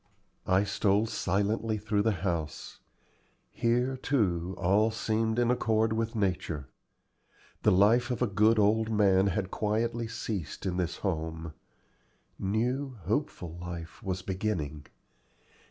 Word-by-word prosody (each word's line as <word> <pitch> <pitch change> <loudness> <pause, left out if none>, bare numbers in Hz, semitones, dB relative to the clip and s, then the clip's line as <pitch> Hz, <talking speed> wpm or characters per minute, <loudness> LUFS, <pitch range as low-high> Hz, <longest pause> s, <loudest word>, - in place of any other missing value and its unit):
I 95 +1 +4
stole 105 +1 +2
silently 110 +2 0
through 105 0 0
the 110 +2 +2
house. 85 -4 -3 0.7
Here, 125 +2 +1
too, 95 -10 0
all 100 +4 +3
seemed 110 0 0
in 120 0 +3
accord 110 -2 +2
with 115 +1 -2
nature. 85 - -1 0.9
The - - +4
life 110 +7 +4
of 125 -3 -1
a 125 - +3
good 110 +1 +3
old 110 +2 +3
man 100 -3 +4
had 95 0 -1
quietly 115 +2 -1
ceased 110 -6 -5
in 90 -2 -1
this 90 -2 -1
home; 80 -3 -3 0.9
new, 125 +6 -1
hopeful 90 - -2
life 85 0 -7
was 95 -3 -3
beginning. 90 -7 -3
105 Hz, 120 wpm, -29 LUFS, 90-115 Hz, 0.9 s, I